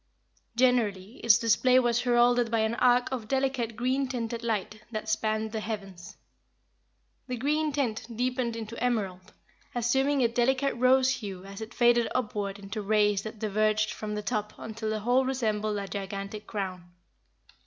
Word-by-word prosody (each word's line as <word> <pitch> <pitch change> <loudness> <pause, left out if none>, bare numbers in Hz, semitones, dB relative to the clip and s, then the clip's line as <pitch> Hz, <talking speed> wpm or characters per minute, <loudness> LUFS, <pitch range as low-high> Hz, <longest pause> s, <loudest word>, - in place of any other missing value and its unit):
Generally, 230 -4 +1
its 230 -1 +5
display 235 +2 +3
was 240 -2 +3
heralded 245 -1 +3
by 225 -1 +1
an 220 +1 +1
arc 245 +1 +3
of 240 -5 -4
delicate 265 -3 0
green 260 +3 0
tinted 235 -2 -3
light, 215 -1 -2
that 220 -1 -5
spanned 215 0 0
the 220 - -2
heavens. 195 -5 -7 1.1
The 250 -1 -3
green 300 +5 0
tint 240 -6 -2
deepened 250 -1 -1
into 230 +1 -6
emerald, 195 -7 -2 0.4
assuming 265 +3 +2
a - - +5
delicate 260 +4 +1
rose 255 +2 +4
hue 195 -4 -7
as 195 +2 -9
it 220 +2 -8
faded 240 -1 +4
upward 210 -5 -2
into 205 +2 -6
rays 210 -1 +2
that 220 +1 -7
diverged 215 0 +1
from 210 -1 -5
the 210 - -4
top 210 0 -2
until 220 0 -5
the 215 -1 -2
whole 245 +4 +3
resembled 215 -5 -1
a 200 -1 -4
gigantic 200 +1 -5
crown. 185 -4 -4
225 Hz, 155 wpm, -28 LUFS, 210-245 Hz, 1.1 s, its